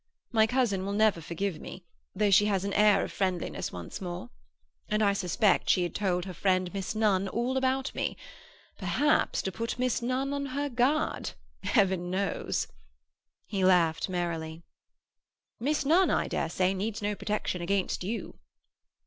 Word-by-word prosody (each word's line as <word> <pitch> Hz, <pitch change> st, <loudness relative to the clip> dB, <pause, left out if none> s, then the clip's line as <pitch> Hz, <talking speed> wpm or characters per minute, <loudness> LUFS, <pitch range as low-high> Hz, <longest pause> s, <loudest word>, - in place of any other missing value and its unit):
My 220 Hz, -2 st, +4 dB
cousin 225 Hz, -6 st, +1 dB
will 200 Hz, +1 st, -2 dB
never 210 Hz, -4 st, +3 dB
forgive 170 Hz, +1 st, -3 dB
me, 185 Hz, -, -9 dB, 0.3 s
though 210 Hz, -1 st, +2 dB
she 205 Hz, +2 st, +6 dB
has 195 Hz, -2 st, 0 dB
an 200 Hz, -, -2 dB
air 210 Hz, 0 st, +5 dB
of -, -, -5 dB
friendliness 185 Hz, -3 st, -2 dB
once 90 Hz, -, -7 dB
more. 175 Hz, -9 st, -6 dB, 0.6 s
And 215 Hz, +1 st, +2 dB
I 200 Hz, -1 st, +4 dB
suspect 195 Hz, +1 st, +2 dB
she 180 Hz, -, +4 dB
had 175 Hz, -, -3 dB
told 180 Hz, -3 st, 0 dB
her 185 Hz, -, -6 dB
friend 185 Hz, 0 st, +1 dB
Miss 195 Hz, +2 st, -3 dB
Nunn 200 Hz, -3 st, +2 dB
all 240 Hz, +6 st, -1 dB
about 265 Hz, 0 st, 0 dB
me. -, -, -2 dB, 0.6 s
Perhaps 295 Hz, +1 st, +1 dB
to 190 Hz, -, -2 dB
put 230 Hz, +5 st, -3 dB
Miss 250 Hz, -1 st, 0 dB
Nunn 255 Hz, +3 st, -1 dB
on 280 Hz, 0 st, -2 dB
her 285 Hz, +2 st, -2 dB
guard—Heaven 240 Hz, -, 0 dB
knows!" 195 Hz, 0 st, -1 dB, 0.8 s
He 195 Hz, -3 st, -2 dB
laughed 175 Hz, -2 st, +3 dB
merrily. 170 Hz, -2 st, -3 dB, 1.0 s
"Miss 290 Hz, +4 st, 0 dB
Nunn, 345 Hz, +6 st, +4 dB
I -, -, +1 dB
dare 165 Hz, -, -1 dB
say, 185 Hz, +2 st, +1 dB
needs 205 Hz, +2 st, -3 dB
no 205 Hz, 0 st, 0 dB
protection 205 Hz, -3 st, -2 dB
against 190 Hz, +1 st, -1 dB
you." 220 Hz, +5 st, -5 dB
200 Hz, 155 wpm, -29 LUFS, 185-235 Hz, 1.0 s, she